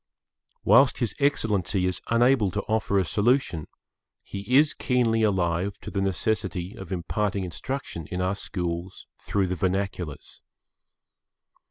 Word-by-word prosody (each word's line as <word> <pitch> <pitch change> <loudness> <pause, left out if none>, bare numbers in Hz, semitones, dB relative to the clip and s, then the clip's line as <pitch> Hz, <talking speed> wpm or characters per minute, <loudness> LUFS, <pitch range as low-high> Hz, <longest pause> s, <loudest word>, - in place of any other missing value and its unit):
Whilst 120 +6 +5
His 115 -6 0
Excellency 105 - +1
is 90 -1 -1
unable 120 -2 +3
to 100 +2 -3
offer 110 -2 0
a 95 - +2
solution, 105 - +1 0.6
he 100 +6 -3
is 150 +1 +5
keenly 120 -4 +1
alive 95 -1 +1
to - - -7
the 100 - -1
necessity 95 -1 -1
of 95 -2 -10
imparting 100 +2 -1
instruction 90 - -5
in 90 - -4
our 90 +1 +1
schools 90 -2 -4
through 100 -1 0
the 90 - -2
vernaculars. 95 -4 -3
100 Hz, 130 wpm, -26 LUFS, 90-110 Hz, 0.6 s, Whilst